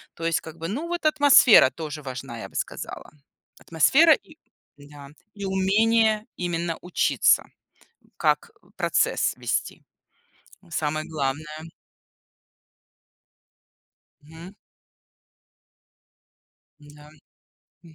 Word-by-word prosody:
То 165 Hz, -, -7 dB
есть 165 Hz, -1 st, 0 dB
как 160 Hz, +1 st, -11 dB
бы, 165 Hz, 0 st, -5 dB
ну, 295 Hz, -, -5 dB
вот 345 Hz, -2 st, -4 dB
атмосфера 285 Hz, -, +6 dB
тоже 150 Hz, 0 st, -7 dB
важна, 130 Hz, -3 st, -8 dB
я -, -, -8 dB
бы -, -, -23 dB
сказала. -, -, -6 dB, 0.5 s
Атмосфера 275 Hz, -, +3 dB
и 315 Hz, +1 st, -7 dB, 0.4 s
да, 145 Hz, -1 st, -14 dB, 0.3 s
и 200 Hz, -1 st, -7 dB
умение 215 Hz, +3 st, +2 dB
именно 170 Hz, -2 st, -3 dB
учиться, 180 Hz, 0 st, +2 dB, 0.7 s
как 470 Hz, 0 st, 0 dB, 0.3 s
процесс -, -, 0 dB
вести. -, -, -3 dB, 0.9 s
Самое 155 Hz, 0 st, -2 dB
главное. 155 Hz, +2 st, -5 dB, 2.5 s
Мгм. 160 Hz, +5 st, -13 dB, 2.3 s
Н-да. 150 Hz, 0 st, -16 dB, 0.8 s
М. 165 Hz, -, -17 dB
165 Hz, 90 wpm, -24 LUFS, 150-215 Hz, 2.5 s, атмосфера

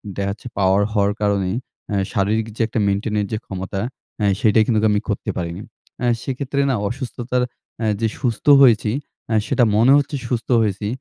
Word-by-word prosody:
দেখা 100 Hz, 0 st, -2 dB
যাচ্ছে 105 Hz, +4 st, -9 dB
পাওয়ার 95 Hz, +1 st, +3 dB
হওয়ার 100 Hz, -1 st, +2 dB
কারণে 100 Hz, -2 st, +1 dB, 0.4 s
এ -, -, +1 dB, 0.2 s
শারীরিক 105 Hz, +3 st, 0 dB
যে -, -, -3 dB
একটা 115 Hz, 0 st, -2 dB
maintain 105 Hz, +2 st, -1 dB
এর 100 Hz, -, 0 dB
যে 110 Hz, -, -1 dB
ক্ষমতা, 95 Hz, 0 st, -5 dB, 0.4 s
এ -, -, +3 dB
সেটাই 110 Hz, 0 st, +4 dB
কিন্তু 110 Hz, -3 st, +2 dB
আমি 105 Hz, -, +1 dB
করতে 105 Hz, -, -2 dB
পারিনি। 85 Hz, +2 st, -4 dB, 0.4 s
আ -, -, +2 dB, 0.2 s
সেক্ষেত্রে 140 Hz, +1 st, -2 dB
না 130 Hz, -, +2 dB
অসুস্থতার 125 Hz, 0 st, -2 dB, 0.4 s
আ -, -, +1 dB
যে 115 Hz, -, +1 dB
সুস্থ 120 Hz, -4 st, -2 dB, 0.2 s
হয়েছি, 110 Hz, -4 st, +5 dB, 0.4 s
আ -, -, +2 dB
সেটা 125 Hz, -, +2 dB
মনে 120 Hz, +5 st, +5 dB
হচ্ছে 145 Hz, +1 st, -1 dB
সুস্থ 120 Hz, 0 st, -3 dB
হয়েছি, 105 Hz, -1 st, -1 dB
110 Hz, 180 wpm, -21 LUFS, 100-120 Hz, 0.4 s, হয়েছি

